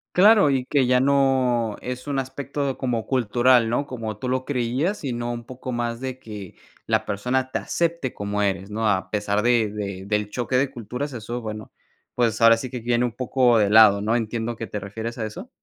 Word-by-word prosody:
Claro, 205 -3 +6
y 130 -2 0
que 135 -1 +2
ya 125 0 +4
no 130 -5 +2
es 125 +2 -6
un 140 -1 -1
aspecto, 135 +1 -3
como 120 -4 -1
cultural, 120 -1 +3
¿no?, 120 +5 0
como 115 -6 -5
tú 125 - -5
lo 130 0 -1
creías, 135 - -1
sino 120 -3 -3
un 120 0 -5
poco 130 +1 -7
más 120 -1 -2
de 130 -1 -4
que 105 -6 -9 0.3
la - - +1
persona 125 +6 -1
te - - -1
acepte 170 -6 -1
como 100 0 -2
eres, 100 0 -1
¿no? 110 +1 0
A 95 -2 -1
pesar 105 0 0
de 120 -3 +3
de 100 -2 -5
del 105 0 0
choque 125 +2 -2
de 135 +1 +2
culturas. 125 +4 -5
Eso, 120 +1 -5
bueno, 110 -1 -7 0.4
pues, 115 -3 +1
ahora 115 0 +7
sí 125 +1 -6
que 125 - -4
viene 120 +1 +1
un 120 - -2
poco 125 -2 +3
de 105 -2 +3
lado, 105 -2 +7
¿no? 110 +3 +1
Entiendo 115 0 -2
que, 115 - -5
¿te 105 - -5
refieres 110 +4 -6
a 110 - -1
eso? 185 - -8
120 Hz, 205 wpm, -23 LUFS, 110-130 Hz, 0.4 s, ahora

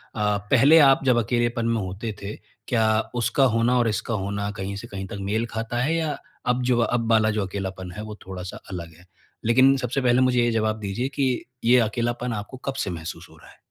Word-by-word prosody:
अ, 105 -1 +1
पहले 140 +6 +7
आप 135 -3 +5
जब 125 -2 +4
अकेलेपन 120 +1 0
में 115 -1 +1
होते 95 +4 -5
थे, 100 +2 -5 0.3
क्या 110 -2 +2 0.2
उसका 120 +3 +2
होना 120 +2 +3
और 120 - +2
इसका 110 +2 -2
होना 100 0 -2
कहीं 100 -1 -5
से 100 +4 -7
कहीं 95 -3 -6
तक 105 - -7
मेल 110 +2 +1
खाता 115 +1 -3
है? 155 +6 +1
या 160 -2 -1 0.3
अब 125 +1 +2
जो 125 -1 +2
अब 115 -1 0
वाला 110 -1 +4
जो 105 -2 -1
अकेलापन 95 -1 -5
है 105 +4 -7
वो 110 -1 -7
थोड़ा-सा 95 -1 -6
अलग 85 -2 -6
है? 90 - -19 0.4
लेकिन 130 +4 +5
सबसे 130 +1 -2
पहले 125 0 +3
मुझे 125 -1 +3
ये 120 - +2
ज़वाब 110 -1 0
दीजिए 105 +5 -2
कि 140 - +2 0.4
ये 120 +2 +5
अकेलापन 120 +1 -1
आपको 105 +4 -6
कब 135 - -1
से - - -3
महसूस 85 0 -7
हो 80 - -18
रहा - - -17
है? - - -18
115 Hz, 220 wpm, -24 LUFS, 100-125 Hz, 0.4 s, पहले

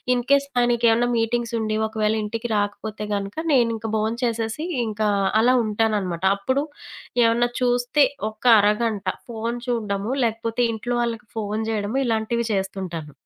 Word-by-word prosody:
In case 275 +3 +2
ఆయనకేవన్నా 240 0 +3
మీటింగ్సుండి, 225 -1 -1
ఒకవేళ 215 -1 0
ఇంటికి 230 +3 -4
రాకపోతే 205 +1 -3
గనక 200 0 -4 0.2
నేనింక 230 -3 +2
భోం 215 +1 0
చేసేసి 230 +5 -1 0.2
ఇంకా 215 0 0 0.3
అలా 250 +3 +4
ఉంటాననమాట. 210 -5 -1
అప్పుడు 260 +8 0 0.6
ఏవన్నా 235 +1 +3
చూస్తే, 245 +3 +3 0.3
ఒక - - -23 0.2
అరగంట 210 0 +1 0.2
ఫోను 230 +1 -3
చూడ్డము, 215 -2 -1
లేకపోతే 230 +1 -2
ఇంట్లో 240 +2 -3
వాళ్ళకి 230 -2 -4
ఫోను 215 +1 -2
జేయడము 215 +3 -1
ఇలాంటివి 230 0 0
చేస్తుంటాను. 190 -5 -4
225 Hz, 120 wpm, -23 LUFS, 210-240 Hz, 0.6 s, అలా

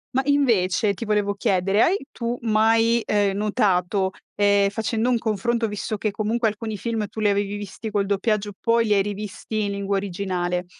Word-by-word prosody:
Ma 265 - +4
invece, 220 -8 +2
ti 215 +5 -6
volevo 210 -1 +1
chiedere, 195 -1 +1
hai 385 +4 +4
tu 235 0 -3
mai, 225 +1 +3
ehm, 200 -2 +1
notato, 195 -2 +1 0.2
ehm, 200 -1 +3
facendo 225 +3 -1
un 245 - +3
confronto, 225 +1 0
visto 210 +1 -4
che 215 0 -1
comunque 220 +3 0
alcuni 215 0 -4
film 225 0 -2
tu 220 - -9
li 210 -1 +3
avevi 200 0 0
visti 205 +2 -7
col 205 -1 0
doppiaggio 205 +1 0
poi 230 0 +2
li 210 - +2
hai 200 - +4
rivisti 205 +1 -4
in 200 - -1
lingua 200 0 -2
originale, 180 -2 -2
210 Hz, 180 wpm, -23 LUFS, 200-225 Hz, 0.2 s, Ma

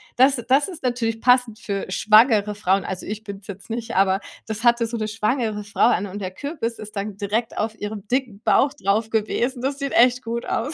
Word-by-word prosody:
Das 265 +2 +5
das 275 +5 +4
ist 350 -7 -9
natürlich 230 -2 -1
passend 245 -3 +3
für 200 -4 -3
schwangere 215 +1 +4
Frauen. 195 -1 +1
Also, 190 -1 -5
ich 215 +1 -5
bin's 200 -2 -9
jetzt 200 +2 -9
nicht, 230 -3 -4
aber 190 0 +3 0.3
das 220 +1 -5
hatte 235 -1 +4
so 230 +1 -4
'ne 215 -1 -2
schwangere 215 -1 -1
Frau 205 +2 +2
an 205 - +1
und 200 +1 -7
der 185 -1 -4
Kürbis 255 - -4
ist 210 0 -10
dann 200 0 -4
direkt 215 +3 -2
auf 220 +1 -2
ihrem 205 -1 -6
dicken 245 -5 -2
Bauch 280 +1 +3
drauf 215 +3 +1
gewesen. 240 +3 -1
Das 275 +2 -2
sieht 275 -1 -3
echt 250 +1 +5
gut 235 +1 -4
aus. 260 +8 -2
225 Hz, 210 wpm, -22 LUFS, 205-245 Hz, 0.3 s, Das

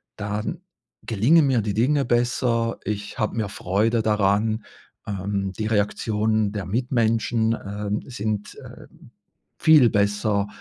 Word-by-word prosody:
dann 105 +1 -4 0.4
gelingen 135 +9 +3
mir 130 -4 +2
die 105 -1 -3
Dinge 135 +5 +2
besser. 120 -1 0
Ich 105 -1 -5
habe 110 - -1
mehr 105 -3 -2
Freude 110 +5 0
daran. 105 +1 +1 0.4
Ähm, 100 -1 -2
die 110 +2 -3
Reaktionen 110 0 0
der 100 -3 -4
Mitmenschen, 115 0 +1
ähm, 105 +1 -3
sind, 110 -5 -4
äh, - - -12 0.7
viel 150 -8 +6
besser. 105 0 +1
110 Hz, 120 wpm, -23 LUFS, 105-115 Hz, 0.7 s, viel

